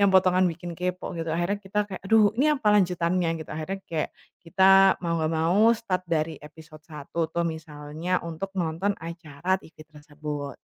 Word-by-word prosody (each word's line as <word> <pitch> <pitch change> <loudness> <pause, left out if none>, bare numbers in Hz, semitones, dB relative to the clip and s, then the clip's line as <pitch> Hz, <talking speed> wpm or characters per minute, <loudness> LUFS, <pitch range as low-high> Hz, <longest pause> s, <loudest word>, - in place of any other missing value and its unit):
yang 200 - +5
potongan 185 0 +5
bikin 175 +1 -7
kepo 180 0 -3
gitu. 165 -1 -3
Akhirnya 175 +5 0
kita 195 +2 -3
kayak, 190 -2 -7
"Aduh 215 -1 +5
ini 290 +5 +3
apa 265 -7 0
lanjutannya?" 180 -2 +2
Gitu. 155 - -9
Akhirnya 190 +5 -4
kayak 160 -2 -1 0.3
kita 190 +2 +5
mau 170 0 0
nggak 155 0 0
mau 180 +8 +4
start 185 -5 -2
dari 160 0 0
episode 155 0 -14
I 145 -2 -8
tuh, 170 -1 +1 0.2
misalnya 160 +2 -3
untuk 170 +4 -5
nonton 170 +4 0
acara 165 +1 -3
TV 160 - -18
tersebut. 150 -2 -7
170 Hz, 170 wpm, -26 LUFS, 160-190 Hz, 0.3 s, yang